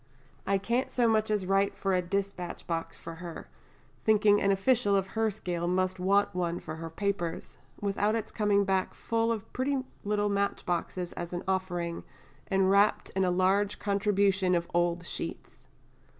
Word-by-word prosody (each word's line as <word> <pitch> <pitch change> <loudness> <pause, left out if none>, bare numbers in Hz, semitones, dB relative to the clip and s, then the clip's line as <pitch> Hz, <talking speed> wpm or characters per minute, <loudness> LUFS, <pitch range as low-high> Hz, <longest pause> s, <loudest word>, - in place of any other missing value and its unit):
I 195 0 +3
can't 235 +6 0
so 240 -2 +2
much 220 -1 +2
as 210 -3 0
write 195 +1 +1
for 195 -1 0
a 180 - +3
dispatch 190 -1 -3
box 165 -1 -3
for 165 - -8
her 170 -2 -7 0.6
(thinking 210 -1 +4
an 200 - +3
official 205 +1 +3
of 195 -1 0
her 220 +2 +1
scale 180 -5 -3
must 185 +1 0
want 200 +2 +2
one 175 -1 -1
for 155 0 -7
her 165 0 -6
papers) 175 -1 -3 0.2
without 205 +2 +1
its 225 - -3
coming 205 -2 +2
back 190 -1 0
full 230 0 0
of 220 -3 -5
pretty 275 +2 0 0.3
little 205 0 +1
match 200 0 -1
boxes 175 0 -2
as 175 0 -6
an 175 - -3
offering, 175 -3 -2 0.4
and 190 0 +3
wrapped 200 +2 +3
in 190 - 0
a 185 - +2
large 190 +3 +2
contribution 200 -2 +2
of 170 0 -1
old 175 0 +1
sheets.... - - -6
195 Hz, 170 wpm, -29 LUFS, 180-205 Hz, 0.6 s, thinking